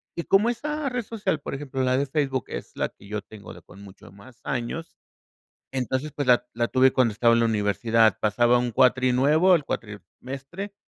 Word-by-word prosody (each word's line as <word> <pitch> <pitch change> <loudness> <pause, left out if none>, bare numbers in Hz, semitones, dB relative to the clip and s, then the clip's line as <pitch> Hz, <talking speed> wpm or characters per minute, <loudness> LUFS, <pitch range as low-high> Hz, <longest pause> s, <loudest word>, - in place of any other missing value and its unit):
Y 170 - -3
como 210 +4 +3
esa 295 +4 -3
red 245 -2 -3
social, 200 -8 -3
por - - -6
ejemplo, 135 -2 -4
la 130 0 +2
de 140 - +1
Facebook, 135 -4 -1
es - - -7
la - - -1
que - - -18
yo 105 0 -4
tengo 105 -1 -12
de - - -14
con 95 +3 -16
mucho 95 -3 -14
más 120 +5 -16
años. 135 +5 -4 0.8
Entonces, 130 +3 -2
pues 145 -3 -3
la 125 0 +4
la 120 0 0
tuve 130 0 +4
cuando 125 -4 +2
estaba 115 +3 +3
en 115 - +2
la 115 - +3
universidad. 110 +1 +2
Pasaba 120 +3 +3
un 120 -1 -2
cuatri 130 +2 +3
nuevo, 155 +8 +4
el 150 -5 +1
cuatrimestre 135 - -7
130 Hz, 200 wpm, -25 LUFS, 115-150 Hz, 0.8 s, la